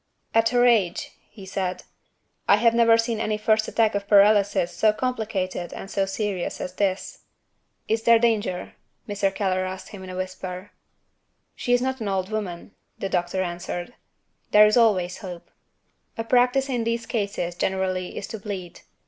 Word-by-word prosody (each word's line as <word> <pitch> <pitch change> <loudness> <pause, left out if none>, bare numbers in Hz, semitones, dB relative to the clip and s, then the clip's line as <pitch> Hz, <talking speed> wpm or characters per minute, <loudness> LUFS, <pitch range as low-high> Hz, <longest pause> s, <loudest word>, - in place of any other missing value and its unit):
"At 225 0 +4
her 245 0 +3
age," 215 -8 +2 0.2
he 205 -3 -12
said, 190 -1 -3 0.6
"I - - +7
have 230 -1 +3
never 230 -1 +5
seen 230 -1 -1
any 215 -1 -1
first 215 0 +2
attack 225 -2 +2
of 200 0 -3
paralysis 200 -4 +4
so 215 +5 +4
complicated 215 -7 -3
and 195 - -8
so 195 -1 0
serious 195 -2 -3
as 180 - -5
this." 190 -1 -2 0.7
"Is 220 0 +1
there 230 0 +6
danger?" 220 -6 0 0.3
Mr. 200 -1 0
Keller 190 -1 0
asked 185 +2 -6
in 190 -2 -8
a 185 - -6
whisper. 185 +1 -6 0.8
"She 245 - -3
is 245 0 +3
not 260 -1 -2
an 215 - -2
old 190 0 -1
woman," 200 -5 -4 0.3
the 195 - -3
doctor 180 +1 0
answered; 175 +3 -5 0.6
"there 210 0 +7
is 210 - +3
always 195 -7 +3
hope. 180 -3 -9 0.6
The 225 - -3
practice 250 +3 +3
in 245 -4 -1
these 230 0 -1
cases 200 -7 -2
generally 185 0 -2
is - - -4
to 220 - -6
bleed. 195 -4 -6
205 Hz, 165 wpm, -24 LUFS, 185-225 Hz, 0.8 s, I